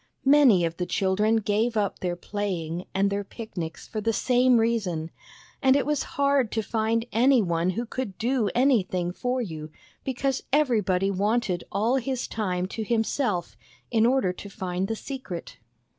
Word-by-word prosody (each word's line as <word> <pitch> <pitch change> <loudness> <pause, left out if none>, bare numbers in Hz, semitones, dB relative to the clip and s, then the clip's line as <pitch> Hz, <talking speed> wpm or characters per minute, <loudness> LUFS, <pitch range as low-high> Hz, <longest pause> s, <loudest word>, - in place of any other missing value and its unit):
Many 265 -11 +6
of 165 0 -3
the 180 - -2
children 200 +3 +2
gave 220 +2 +1
up 205 -2 0
their 180 -1 -2
playing 175 -3 -4
and 200 +1 +1
their 200 0 -1
picnics 185 -7 -7
for 215 - -4
the 225 - +1
same 250 +2 +3
reason, 200 -9 0 0.5
and 265 -1 +5
it 285 - +2
was 295 -1 0 0.2
hard 280 -4 +2
to 220 - 0
find 225 +1 0
any 255 +3 +4
one 170 -3 +1
who 240 - -1
could 230 -5 -5
do 235 -2 +1
anything 190 -9 +2
for 250 +5 -1
you, 155 -6 -6 0.3
because 265 0 -1
everybody 210 -10 +2
wanted 200 -2 0
all 225 +7 +2
his 260 0 -2
time 185 -5 -2
to 220 - -4
himself 225 -3 -1 0.4
in 225 -1 +4
order 245 -8 +2
to 200 - -9
find 185 -1 -3
the 225 - -2
secret. 210 - -7
215 Hz, 160 wpm, -26 LUFS, 185-245 Hz, 0.5 s, Many